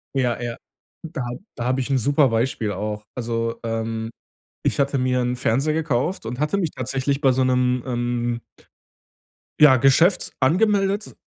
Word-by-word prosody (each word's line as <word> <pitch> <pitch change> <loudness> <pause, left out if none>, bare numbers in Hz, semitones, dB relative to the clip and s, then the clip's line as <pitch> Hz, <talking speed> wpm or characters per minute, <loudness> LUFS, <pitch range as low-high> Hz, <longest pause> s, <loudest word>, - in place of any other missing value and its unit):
Ja, 125 -3 +1
ja, 120 -1 -4 0.5
da 155 -5 -5
hab 120 0 -5 0.2
da 120 - -4
habe 130 +1 +1
ich 130 - -4
'n 135 - +2
super 140 +3 +3
Beispiel 115 -2 -1
auch. 105 +2 -4
Also, 115 -1 -3
ähm, 115 0 -3 0.5
ich - - 0
hatte 140 0 +1
mir 125 0 +1
'n 125 0 -1
Fernseher 135 +5 +1
gekauft 155 0 -1
und 120 +3 -5
hatte 150 +7 0
mich 170 -6 -1
tatsächlich 135 +2 -2
bei 135 -3 +5
so 130 +1 +2
'nem, 125 -1 +1
ähm 120 -1 -2 1.2
ja, 145 -4 +8
Geschäft 165 +8 +3
angemeldet 200 +7 +2
125 Hz, 160 wpm, -22 LUFS, 120-140 Hz, 1.2 s, ja